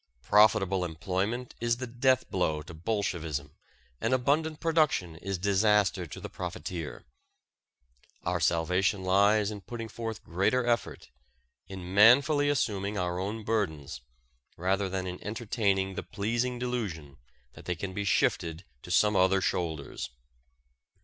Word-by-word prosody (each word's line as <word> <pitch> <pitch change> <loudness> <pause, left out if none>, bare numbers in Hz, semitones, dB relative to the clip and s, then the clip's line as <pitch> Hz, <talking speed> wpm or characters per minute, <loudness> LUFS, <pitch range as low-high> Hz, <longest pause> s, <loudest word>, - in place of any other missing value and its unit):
Profitable 100 - +4
employment 95 +8 -2
is 120 0 +1
the 130 - -4
death 125 +1 +2
blow 80 -6 0
to 85 - -11
Bolshevism 80 -6 -2 0.5
and 130 - +2
abundant 150 +5 0
production 155 - +1
is 95 +3 -3
disaster 100 -1 +2
to - - -8
the - - -6
profiteer. 80 -1 -6 1.2
Our - - 0
salvation 90 +4 +1
lies 100 +3 +3
in 105 -1 -7
putting 115 +4 -6
forth 110 -3 -5
greater 100 +9 +1
effort, 120 -2 -1 0.6
in 95 -1 -7
manfully 140 +8 +6
assuming 105 -7 0
our 90 -1 -1
own 105 +4 -3
burdens, 80 - -2 0.6
rather 95 +2 0
than 95 0 -3
in 90 0 -6
entertaining 105 -3 0
the - - -4
pleasing 120 +4 -2
delusion 100 - -4 0.4
that - - -13
they 90 - -1
can 95 +2 -5
be 100 - -2
shifted 85 -3 0 0.2
to 90 - -12
some 105 +4 +3
other 95 +1 +4
shoulders. 80 -6 -2
100 Hz, 130 wpm, -29 LUFS, 90-115 Hz, 1.2 s, manfully